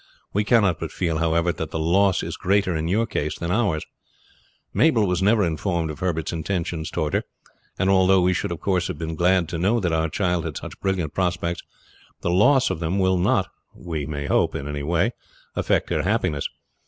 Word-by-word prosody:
We 105 - +2
cannot 100 -6 +3
but - - -4
feel, 80 -3 -1
however, 85 +1 +2
that 80 -1 -5
the - - -4
loss 90 +4 +2
is - - -4
greater 95 -2 +1
in 80 +1 -1
your 105 +6 +2
case 75 -9 -3
than 85 0 -3
in - - +2
ours. 100 -10 0 0.9
Mabel 125 -9 +4
was 90 -1 0
never 105 +1 +4
informed 85 0 -1
of 75 - -9
Herbert's 85 -4 -1
intentions 85 -1 -2
toward 75 -4 -2
her, - - +1 0.5
and 95 - +1
although 95 0 +5
we 90 +1 +3
should 85 - -2
of 85 - -4
course 90 -3 +1
have - - -5
been 80 +1 -4
glad 90 +1 +2
to 85 - -3
know 105 +7 +2
that 90 -5 0
our 80 0 +1
child 90 -2 0
had 80 - -4
such - - -8
brilliant 95 -6 -1
prospects, 85 -2 -1 0.6
the 85 - 0
loss 125 +7 +4
of 90 - -3
them 85 +3 -1
will 95 -1 +2
not 90 - +2 0.3
we 80 -5 -5
may 70 -2 -4
hope - - +1
in 70 - -4
any 75 -1 -4
way 85 +9 +1 0.4
affect - - 0
her - - +1
happiness. 90 -8 0
90 Hz, 205 wpm, -23 LUFS, 80-95 Hz, 0.9 s, although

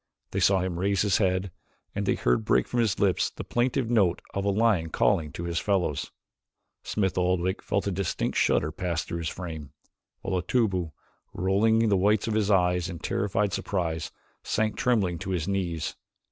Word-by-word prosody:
They - - -1
saw 95 -1 +4
him 90 -2 -3
raise 100 +1 +1
his 100 -1 +2
head 95 -1 +1 0.4
and - - -3
they - - +3
heard - - +1
break - - +2
from 120 - -1
his 110 -5 +2
lips 95 -3 +2
the - - -8
plaintive 125 +1 0
note 95 -7 +3
of 100 - -2
a - - +2
lion 100 -5 +2
calling 75 -1 +1
to 85 - -5
his 85 -1 -1
fellows. 95 -8 0 0.7
Smith 95 -3 -1
Oldwick 90 +1 0
felt 100 - -1
a 100 - 0
distinct 95 -2 -2
shudder 75 - +2
pass 85 0 -2
through 85 - -5
his 80 - -2
frame, 80 -6 -7 0.5
while 95 -2 -1
Otobu, 95 -4 0 0.4
rolling 110 +5 +3
the 100 - +3
whites 105 +4 +2
of 110 - 0
his 105 -1 +1
eyes 90 -2 +2
in 85 - -6
terrified 100 +4 -1
surprise, 80 -5 -2 0.3
sank 110 0 0
tremblingly 100 -9 +1
to 95 - -6
his 90 -4 -1
knees. 90 -5 -2
95 Hz, 180 wpm, -27 LUFS, 85-105 Hz, 0.7 s, saw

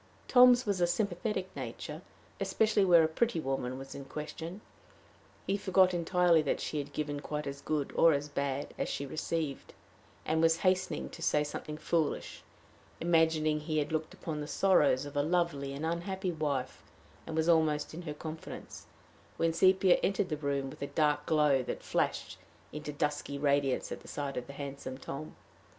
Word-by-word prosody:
Tom's 250 0 +7
was 200 -4 0
a 175 - +4
sympathetic 190 +1 -2
nature, - - -6 0.4
especially 215 -2 +2
where 175 -3 +6
a - - +4
pretty 175 +4 0
woman 135 -3 -2
was 135 0 -8
in 140 - -7
question. 160 +6 -7 0.8
He 195 - 0
forgot 190 -1 +4
entirely 175 -1 +3
that 145 - -1
she 150 - -3
had 145 0 -5
given 145 -1 -3
quite 150 +1 -4
as 140 0 -5
good, 150 -2 -1
or 165 - +6
as 145 -1 0
bad, 140 -1 -3
as - - -1
she 140 - -3
received, 155 0 -3 0.5
and 160 +1 +1
was 165 0 +4
hastening 185 0 +1
to 165 - -10
say 150 -2 +2
something 150 +1 -6
foolish, 160 -1 -1 0.6
imagining 160 -2 +2
he 155 +1 -2
had 150 0 0
looked 155 0 -2
upon 155 -2 -4
the 150 - -5
sorrows 150 -8 +3
of 145 - -9
a 145 - +3
lovely 160 -4 0
and 140 +3 -4
unhappy 185 +3 -2
wife 140 -5 -2 0.5
and 160 - -4
was 160 0 +1
almost 160 -3 +2
in 165 - -6
her 155 -4 -5
confidence, 160 +1 -8 0.5
when 165 0 +1
Sepia 185 +1 +5
entered 195 -1 0
the 155 - -2
room, 140 -2 -2
with 150 - -13
a 140 - -2
dark 150 0 +1
glow 150 -4 +4
that 125 - -5
flashed - - -1 0.3
into 150 0 -5
dusky 145 -1 -2
radiance 140 -2 +1
at - - -7
sight 140 -1 -4
of 125 - -4
the 140 - -8
handsome 140 -2 -6
Tom. 145 +3 -7
155 Hz, 175 wpm, -31 LUFS, 145-175 Hz, 0.8 s, Tom's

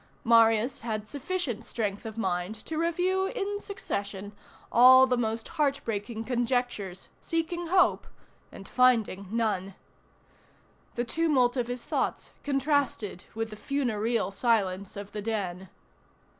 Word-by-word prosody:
Marius 230 +1 +4
had 215 -2 -4
sufficient 285 - -3
strength 210 -1 -3
of 220 0 -8
mind 185 -1 -1
to 310 +8 -5
review 365 +3 +1
in 410 -2 -3
succession 200 - -5 0.4
all 260 +2 +8
the 255 -1 +1
most 225 -1 -2
heart 280 -2 +1
breaking 225 +1 -3
conjectures, 245 -6 -2
seeking 335 +1 -2
hope 370 +2 +3 0.4
and 195 - -11
finding 230 -6 +2
none. 205 -4 -1 1.2
The 240 - -1
tumult 270 -4 +2
of 245 -3 -1
his 245 0 -5
thoughts - - -2
contrasted 275 - 0
with 225 0 -3
the - - -7
funereal 230 -4 -1
silence 200 -3 0
of 200 0 -7
the 210 - -5
den. 190 -4 -3
230 Hz, 125 wpm, -28 LUFS, 205-275 Hz, 1.2 s, all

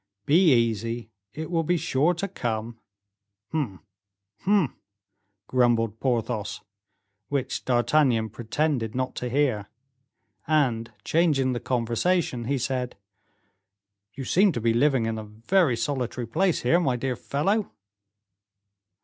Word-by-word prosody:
"Be 165 +3 +5
easy, 115 0 -1 0.2
it 155 +6 -6
will 165 -1 +2
be 175 +2 +1
sure 155 +3 +1
to 195 +4 -2
come." 115 - -4 0.7
"Humph! 130 - -2 0.6
humph!" 195 - +2 0.7
grumbled 115 -3 +2
Porthos, 115 -5 -1 0.7
which 140 -2 -2
D'Artagnan 120 -2 +2
pretended 120 0 -1
not 130 0 -1
to 125 - -3
hear; 125 -6 0 0.8
and, 130 -7 +1
changing 150 -6 +2
the 120 - -2
conversation, 120 +3 0
he 140 +3 0
said, 125 0 -2 1.2
"You 135 - -5
seem 190 +8 +4
to 120 - -2
be 115 0 +2
living 130 -1 +3
in 110 -1 -2
a - - -6
very 115 - +1
solitary 125 0 -2
place 175 - +1
here, 145 +8 +4
my 135 -8 +1
dear 125 +1 -2
fellow?" 195 - -1
125 Hz, 120 wpm, -26 LUFS, 115-155 Hz, 1.2 s, Be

